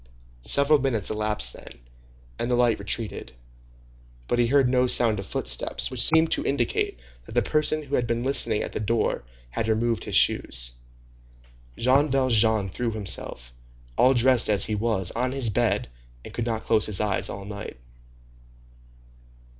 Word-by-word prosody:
Several 140 - +3
minutes 120 -7 -1
elapsed 105 -11 0
thus, - - -12 0.7
and 120 - -2
the 125 - +2
light 120 -2 +2
retreated. 100 - -4 0.9
But 120 - 0
he 120 - +3
heard 135 +1 +3
no 125 0 +2
sound 115 -4 +3
of 95 - -7
footsteps, - - -1
which 130 -2 -2
seemed 160 +3 +4
to - - 0
indicate 120 - -1 0.3
that - - -12
the - - +2
person 155 0 +1
who 140 -1 -11
had 120 -3 +1
been 115 0 -2
listening 135 -5 +2
at - - -6
the - - -4
door 110 - -1 0.3
had 110 - -3
removed 115 +1 -1
his - - -3
shoes. - - +1 1.1
Jean 135 +5 +3
Valjean 110 -6 +2
threw 120 +6 -3
himself, 95 - -2 0.4
all 130 - +4
dressed 125 -1 +4
as 105 -2 +4
he 110 - -3
was, 105 -4 0
on 125 +2 -2
his 130 -5 +1
bed, - - 0 0.4
and - - -11
could 120 0 -3
not 110 -1 -2
close 110 -2 +2
his 105 -3 0
eyes 105 -2 -1
all 100 0 -7
night. 100 -9 -8
115 Hz, 160 wpm, -24 LUFS, 105-130 Hz, 1.1 s, seemed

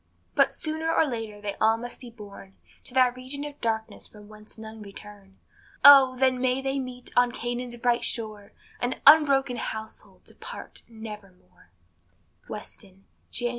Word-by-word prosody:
But - - +4
sooner 315 +1 -2
or 325 - +3
later 225 -6 -5
they 205 -1 -4
all 220 +1 +4
must 240 +1 -8
be 245 - -10
borne 200 -4 -13 0.3
To 250 - -11
that 250 -1 +4
region 265 +3 -4
of 290 -1 -10
darkness 220 -1 -3
from 210 -1 -15
whence 215 +1 -14
none 220 0 -10
return; 200 -1 -12 0.5
Oh! 270 -2 +9
then 260 -1 +2
may 255 0 +1
they 270 +1 -2
meet 250 -1 -7
on 245 0 +4
Canaan's 240 0 -4
bright 240 0 0
shore, 215 -3 -4 0.3
An 245 +1 -1
unbroken 275 -5 +6
household 220 0 -7
to - - -9
part - - -9
nevermore. 205 - -12 0.8
Weston, 195 0 -10 0.2
Jan. 240 0 -1
240 Hz, 155 wpm, -26 LUFS, 210-255 Hz, 0.8 s, Oh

